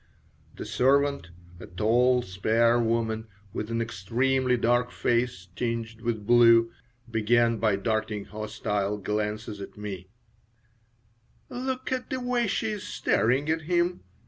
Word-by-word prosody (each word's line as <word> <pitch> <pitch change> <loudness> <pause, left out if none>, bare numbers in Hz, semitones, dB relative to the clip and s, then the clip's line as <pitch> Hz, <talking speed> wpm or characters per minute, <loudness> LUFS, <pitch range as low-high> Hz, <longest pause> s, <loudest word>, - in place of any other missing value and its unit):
The - - -7
servant, 140 -5 +2 0.3
a - - -9
tall, 120 +7 +2
spare 115 +5 +2
woman, 115 -1 -1 0.3
with 105 - -4
an 115 0 0
extremely 125 +5 0
dark 120 +1 +2
face 120 -7 -1
tinged 115 -2 -3
with 115 -3 -2
blue, 115 0 +6 0.4
began 115 +1 +2
by 110 -2 +2
darting 110 0 -2
hostile 105 -1 -3
glances 105 +1 -3
at 100 - -9
me 100 -3 -6 1.4
"Look 255 +1 -4
at 255 -1 -2
the 260 - -2
way 245 -2 0
she 220 +2 -1
is 210 -2 -4
staring 130 +6 +1
at 160 0 0
him!" 175 +2 0
115 Hz, 125 wpm, -27 LUFS, 105-130 Hz, 1.4 s, blue